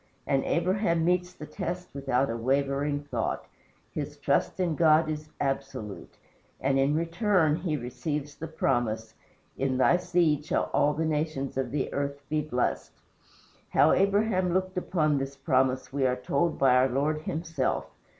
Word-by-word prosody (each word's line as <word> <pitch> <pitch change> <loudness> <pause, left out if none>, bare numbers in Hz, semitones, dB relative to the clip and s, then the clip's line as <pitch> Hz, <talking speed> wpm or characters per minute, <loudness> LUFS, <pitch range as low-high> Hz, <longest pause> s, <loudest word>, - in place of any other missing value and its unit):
And 135 -1 +1
Abraham 170 -1 +1
meets 180 +1 +1
the 155 - -9
test 180 +3 -5
without 135 -2 0
a - - -2
wavering 140 +4 0
thought; 125 -6 -2 0.5
his - - -4
trust - - 0
in 175 -3 +1
God 155 0 +4
is 155 0 -4
absolute: 135 -7 -4 0.4
and 135 0 +1
in 140 +2 +2
return 165 -1 +2
he 165 -4 -2
receives 145 +4 -4
the 160 - -7
promise, 120 -7 -1 0.5
"In 130 -1 0
THY 150 +7 +4
SEED 175 -5 +1
shall - - -1
all 145 0 +3
the 160 +2 0
nations 150 -3 -2
of 135 0 -1
the 145 -2 -2
earth 140 0 -2
be 155 0 +1
blessed." 125 -5 -2 0.7
How - - +5
Abraham 195 -2 +2
looked 185 0 0
upon 155 -5 +1
this 135 +1 -4
promise 130 -2 +1
we 135 -2 +2
are 125 - +1
told 140 +6 0
by 135 -2 +4
our 130 +1 +4
Lord 145 +4 0
himself. 160 -4 -2
150 Hz, 155 wpm, -28 LUFS, 135-170 Hz, 0.7 s, How